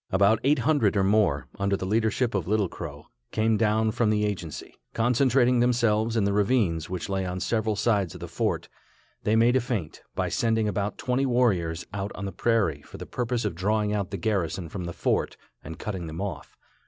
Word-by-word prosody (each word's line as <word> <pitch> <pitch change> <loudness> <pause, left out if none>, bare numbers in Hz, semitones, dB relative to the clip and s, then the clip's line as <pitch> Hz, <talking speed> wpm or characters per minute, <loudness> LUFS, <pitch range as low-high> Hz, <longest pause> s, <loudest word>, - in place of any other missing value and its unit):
About 100 +3 +4
eight 145 +3 +4
hundred 135 -10 +2
or 95 - +3
more, 95 -10 +2
under 100 0 +1
the 95 - -4
leadership 110 +4 +1
of 95 -5 -1
Little 105 -1 +2
Crow, 75 -4 -8 0.2
came 110 0 +1
down 110 0 +2
from 120 -1 +1
the 105 0 +2
agency. 90 -7 -5 0.2
Concentrating 125 +1 +3
themselves 115 -2 +2
in 110 - +3
the 100 0 +1
ravines 100 -7 +1
which 90 -1 -4
lay 95 -1 -1
on 90 0 -3
several 110 +1 0
sides 100 -5 +1
of - - -9
the - - -6
fort, - - -1 0.5
they 105 - +1
made 115 +3 +4
a 130 - +4
feint, 110 -10 -4
by - - 0
sending 110 -2 +1
about 105 0 -2
twenty 130 +2 0
warriors 95 -10 +1
out 100 0 -3
on 100 - -5
the 95 - -3
prairie 100 -13 +1
for - - -12
the - - -7
purpose 120 -2 -2
of 105 - -1
drawing 105 +4 0
out 100 -3 -1
the 100 - -4
garrison 90 -4 -1
from 90 +1 -5
the 85 - -5
fort, - - 0 0.3
and 80 - -8
cutting 95 -5 -4
them 80 +2 -6
off. 100 -1 -5
105 Hz, 205 wpm, -26 LUFS, 95-115 Hz, 0.5 s, About